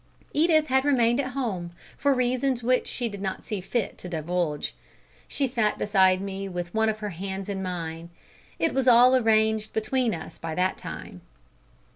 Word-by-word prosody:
Edith 310 0 +4
had 265 -1 +2
remained 245 -3 +3
at 260 -2 -2
home, 190 -10 -3 0.2
for 285 - +2
reasons 255 -1 +1
which 255 +1 +2
she 245 - -2
did 200 -3 -7
not 190 -1 -3
see 210 -3 -3
fit 220 +3 -2
to 180 - -7
divulge. 165 -2 -2 0.5
She 280 - -1
sat 230 -5 0
beside 190 -2 +3
me 195 0 -4
with 175 -1 -5
one 220 0 +2
of 215 - -2
her 210 - -2
hands 190 +2 -5
in 195 -2 -3
mine. 170 -2 -5 0.5
It 325 - +1
was 265 -1 0
all 250 +1 +7
arranged 220 -2 +2
between 225 +1 0
us 160 - -9
by 160 -1 -4
that 185 +1 0
time. - - -8
215 Hz, 175 wpm, -26 LUFS, 185-255 Hz, 0.5 s, all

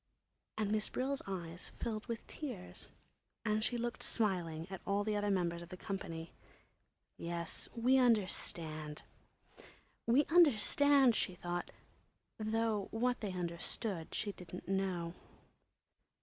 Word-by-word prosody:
And 210 -2 0
Miss 215 -1 +1
Brill's 270 +2 -1
eyes 175 -3 -4
filled 215 -1 -3
with 230 -1 -4
tears 245 -12 -6 0.6
and 215 0 +2
she 240 - +1
looked 240 0 -2
smiling 175 -7 0
at 190 - -5
all 200 +1 +1
the 215 0 0
other 205 0 +1
members 170 -3 +1
of 170 - -9
the 185 - -7
company. 165 -4 -5 0.9
Yes, 170 0 -2
we 250 +3 +5
understand, 165 -9 +1 1.0
we 255 +6 +5
understand, 285 -4 +6
she 185 - 0
thought—though 215 +4 -3
what 245 +2 0
they 205 -4 -2
understood 175 +1 -3
she 205 - 0
didn't 180 -2 -9
know. 185 -3 0
200 Hz, 120 wpm, -36 LUFS, 175-230 Hz, 1.0 s, understand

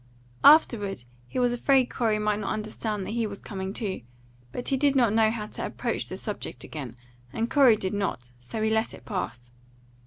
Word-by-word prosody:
Afterward 205 - +5 0.2
he - - -7
was 245 -1 +3
afraid 260 +1 +3
Corey 225 -4 +1
might 210 0 0
not 200 - -2
understand 215 -1 -3
that - - -5
he 230 -1 0
was 200 -1 -7
coming 190 -2 -5
too; 200 - -3 0.5
but 245 - -3
he 275 - +2
did 280 +1 +2
not 240 -5 +4
know 220 -1 +4
how 220 -1 -3
to - - -7
approach - - -3
the - - -5
subject - - -5
again, 135 -7 -7 0.4
and 230 +1 -2
Corey 270 -6 +6
did 190 -2 -3
not, 125 -12 -3
so 125 - -5
he 220 - +2
let 220 +1 0
it - - -16
pass. 120 - -5
215 Hz, 195 wpm, -27 LUFS, 195-235 Hz, 0.5 s, Corey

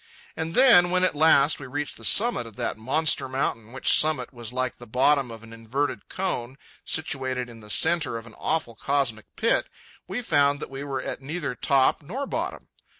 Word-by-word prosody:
And 160 +1 -4
then, 235 -10 +7
when 180 0 +2
at 185 - +2
last 150 -1 +4
we 135 - -8
reached 145 +3 -4
the - - -13
summit 220 - +3
of 110 - -13
that - - -2
monster 135 +3 +1
mountain, 115 -4 -2
which 130 +1 +1
summit 150 -5 0
was 120 -2 -7
like 130 0 -2
the 120 - -12
bottom 130 +3 +2
of 115 -1 -10
an 115 0 -12
inverted 120 +6 -3
cone 135 -9 -3 0.3
situated 130 -5 -1
in 115 - -13
the 105 -1 -14
centre 160 -1 +2
of 115 - -9
an 115 - -13
awful 155 -7 -1
cosmic 115 -2 -1
pit, 230 - +1 0.4
we 245 - -4
found 145 -7 +2
that - - -7
we 135 +1 -6
were 135 -2 -4
at - - -5
neither 140 0 -4
top 135 +3 +2
nor 240 - -5
bottom. 330 +6 -5
140 Hz, 195 wpm, -25 LUFS, 120-160 Hz, 0.4 s, then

